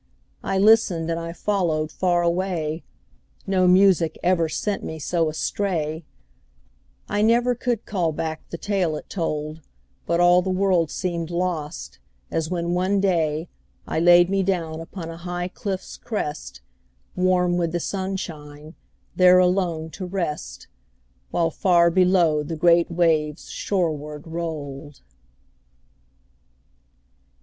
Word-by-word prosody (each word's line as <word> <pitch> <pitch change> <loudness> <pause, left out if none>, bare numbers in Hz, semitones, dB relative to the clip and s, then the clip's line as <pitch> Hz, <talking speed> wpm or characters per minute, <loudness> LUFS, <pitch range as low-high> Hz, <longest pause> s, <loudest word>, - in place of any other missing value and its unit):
I 195 - -1
listened, 195 -5 +4
and 165 - -1
I 165 0 -5
followed 170 -5 -1
far 175 -2 +1
away 170 -3 -1 0.6
No 185 -2 +2
music 180 -3 +4
ever 175 -3 +2
sent 200 +6 -2
me 160 - -5
so 165 +1 0
astray, 160 -1 -2 1.0
I 205 +1 -1
never 240 +3 +3
could 240 -2 -2
call 180 -6 0
back 155 +1 -5
the 170 - -5
tale 185 -5 -1
it - - -9
told, 155 -3 -3 0.5
But 170 +1 +1
all 175 +1 +6
the 190 - -3
world 185 -3 +2
seemed 170 -2 -3
lost, 170 - -3 0.3
as 160 -1 -1
when, 175 -1 -1
one 185 +3 +1
day, 165 -4 0 0.4
I - - -2
laid 175 +1 +6
me 195 +1 +1
down 170 -4 -1
upon 165 0 -7
a 165 - -9
high 175 +1 -4
cliff's 190 0 -5
crest, 150 - -5 0.5
Warm 180 -1 +2
with 170 -2 0
the 175 - -1
sunshine, 160 -6 -5 0.4
there 180 0 +6
alone 180 -3 +1
to 185 +1 -6
rest, 175 -5 -4 0.6
While 165 -1 0
far 170 0 +3
below 180 -4 +3
the 160 +2 -5
great 170 +1 +4
waves 160 -3 0
shoreward 150 -6 -2
rolled. 155 -4 -6
175 Hz, 125 wpm, -23 LUFS, 160-185 Hz, 1.0 s, all